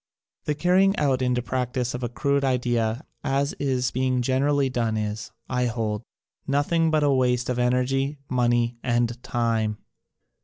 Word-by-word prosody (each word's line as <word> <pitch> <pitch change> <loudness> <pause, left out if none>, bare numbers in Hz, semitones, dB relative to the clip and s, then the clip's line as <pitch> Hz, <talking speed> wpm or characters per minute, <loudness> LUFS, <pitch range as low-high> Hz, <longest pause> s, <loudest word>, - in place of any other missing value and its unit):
The 150 - 0
carrying 185 +5 +3
out 135 -3 +1
into 125 -1 +1
practise 125 -1 -2
of 125 - -4
a 120 - -2
crude 140 +3 0
idea 120 -1 0 0.2
as 140 +1 0
is 130 -3 0
being 130 -1 0
generally 140 +2 +2
done 115 -4 -1
is, 105 0 -4 0.2
I 125 -1 0
hold, 110 -2 -2 0.5
nothing 155 +4 +2
but 155 -1 +2
a 145 - +4
waste 125 -2 +1
of 125 -1 -1
energy, 130 +3 +1
money 120 -1 +1
and 120 -1 0
time. 115 -3 0
125 Hz, 150 wpm, -25 LUFS, 120-140 Hz, 0.5 s, a